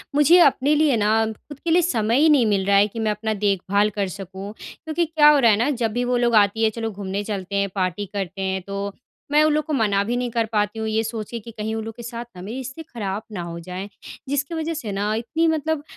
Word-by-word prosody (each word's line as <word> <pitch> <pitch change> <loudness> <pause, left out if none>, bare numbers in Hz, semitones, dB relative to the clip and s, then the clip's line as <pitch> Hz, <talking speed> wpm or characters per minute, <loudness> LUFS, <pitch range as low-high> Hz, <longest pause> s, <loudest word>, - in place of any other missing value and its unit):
मुझे 320 +5 +6
अपने 285 -2 +4
लिए 300 -3 +3
ना 215 +1 +2
ख़ुद 220 +6 -9
के 330 - -2
लिए 350 +2 +5
समय 235 -7 +1
ही 315 +1 +5
नहीं 280 -6 +5
मिल 200 -3 +1
रहा 200 0 +4
है, 200 +1 +5
कि 220 +2 -8
मैं 220 -1 +1
अपना 215 +1 -2
देखभाल 200 +1 +2
कर 200 - +1
सकूँ। 195 +1 -8
क्योंकि 330 +2 -3
क्या 305 -2 +5
हो 295 -2 +5
रहा 235 -3 +5
है 205 - +3
ना? 240 +6 +1
जब 235 -6 -1
भी 245 +2 0
वो 245 0 +1
लोग 240 -1 +2
आती 210 +1 +4
है, 220 - +5
चलो 225 0 -4
घूमने 200 0 -4
चलते 200 -2 -4
हैं, 200 0 +1
पार्टी 185 +1 -1
करते 195 -1 -4
हैं, 190 0 -1
तो 200 0 -3 0.4
मैं 300 +1 +5
उन 310 - +3
लोगों 305 - +2
को 310 - -3
मना 200 -2 +2
भी 235 +4 -2
नहीं 245 0 -1
कर 230 0 +1
पाती 210 0 0
हूँ, 220 - -2
ये 220 0 +1
सोच 225 -2 -5
के 235 - -4
कि 230 +2 -11
कहीं 220 0 -4
उन 220 - -3
लोग 225 -1 -7
के 240 - -10
साथ 235 0 -6
ना 180 - -9
मेरी 215 +7 -6
रिश्ते 265 +4 -7
ख़राब 210 -8 -4
ना 195 -4 -4
हो 170 0 -6
जाएँ। 185 +3 -7 0.4
जिसकी 285 +3 -1
वजह 320 +1 -2
से 240 -10 -5
ना, 205 +2 -1
इतनी 240 +9 -1
मतलब 315 -1 0
220 Hz, 265 wpm, -22 LUFS, 200-270 Hz, 0.4 s, मुझे